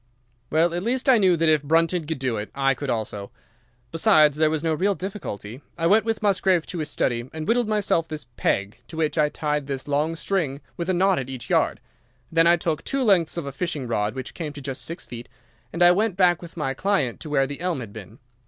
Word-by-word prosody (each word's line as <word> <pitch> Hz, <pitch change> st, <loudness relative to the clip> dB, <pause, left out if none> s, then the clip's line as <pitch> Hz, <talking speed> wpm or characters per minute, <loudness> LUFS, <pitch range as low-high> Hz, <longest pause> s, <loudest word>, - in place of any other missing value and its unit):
"Well, 165 Hz, +2 st, +2 dB
at 175 Hz, -, -2 dB
least 250 Hz, +6 st, -1 dB
I 255 Hz, -4 st, +6 dB
knew 185 Hz, -4 st, +4 dB
that 165 Hz, 0 st, +2 dB
if 155 Hz, -2 st, +4 dB
Brunton 165 Hz, +2 st, +1 dB
could 160 Hz, -1 st, -2 dB
do 130 Hz, -3 st, -1 dB
it, 105 Hz, 0 st, -5 dB
I 135 Hz, 0 st, +2 dB
could 135 Hz, +1 st, -6 dB
also. 105 Hz, -4 st, -3 dB, 0.6 s
Besides, 155 Hz, -5 st, +4 dB
there 155 Hz, 0 st, +3 dB
was 155 Hz, 0 st, -1 dB
no 165 Hz, -1 st, +1 dB
real 195 Hz, +5 st, +1 dB
difficulty. 140 Hz, -, -6 dB, 0.2 s
I 165 Hz, -, -1 dB
went 210 Hz, +5 st, +4 dB
with 225 Hz, -2 st, -2 dB
Musgrave 190 Hz, -4 st, +2 dB
to 175 Hz, -, -6 dB
his 155 Hz, -1 st, -3 dB
study 120 Hz, -3 st, -1 dB
and 155 Hz, -1 st, -6 dB
whittled 240 Hz, 0 st, +2 dB
myself 205 Hz, -6 st, +1 dB
this 155 Hz, -2 st, -6 dB
peg, 100 Hz, +4 st, -1 dB
to 160 Hz, -, -10 dB
which 160 Hz, 0 st, 0 dB
I 150 Hz, -1 st, +4 dB
tied 150 Hz, -2 st, -2 dB
this 135 Hz, 0 st, -4 dB
long 150 Hz, +3 st, 0 dB
string 155 Hz, -4 st, -1 dB, 0.2 s
with 170 Hz, +1 st, -4 dB
a -, -, +3 dB
knot 190 Hz, +1 st, +3 dB
at 130 Hz, -1 st, -5 dB
each 130 Hz, -3 st, -7 dB
yard. -, -, +2 dB, 0.5 s
Then 165 Hz, 0 st, +4 dB
I 170 Hz, -, +6 dB
took 160 Hz, -1 st, -2 dB
two 275 Hz, -1 st, -1 dB
lengths 185 Hz, -7 st, +3 dB
of 170 Hz, -, -3 dB
a 140 Hz, -, -4 dB
fishing 145 Hz, -3 st, -3 dB
rod, 105 Hz, -1 st, -1 dB
which 130 Hz, -, -6 dB
came 155 Hz, -4 st, -5 dB
to 145 Hz, -, -8 dB
just 135 Hz, -1 st, -4 dB
six 165 Hz, +2 st, -6 dB
feet, 120 Hz, 0 st, -9 dB, 0.4 s
and 170 Hz, -, +1 dB
I 175 Hz, -, +8 dB
went 200 Hz, +1 st, +1 dB
back 175 Hz, -3 st, +3 dB
with 170 Hz, -1 st, -11 dB
my 135 Hz, -4 st, -1 dB
client 185 Hz, -6 st, 0 dB
to 155 Hz, -, -8 dB
where 135 Hz, -2 st, +2 dB
the 140 Hz, +3 st, -7 dB
elm 180 Hz, -5 st, -1 dB
had 115 Hz, -5 st, -8 dB
been. 110 Hz, +1 st, -10 dB
160 Hz, 235 wpm, -24 LUFS, 135-180 Hz, 0.6 s, I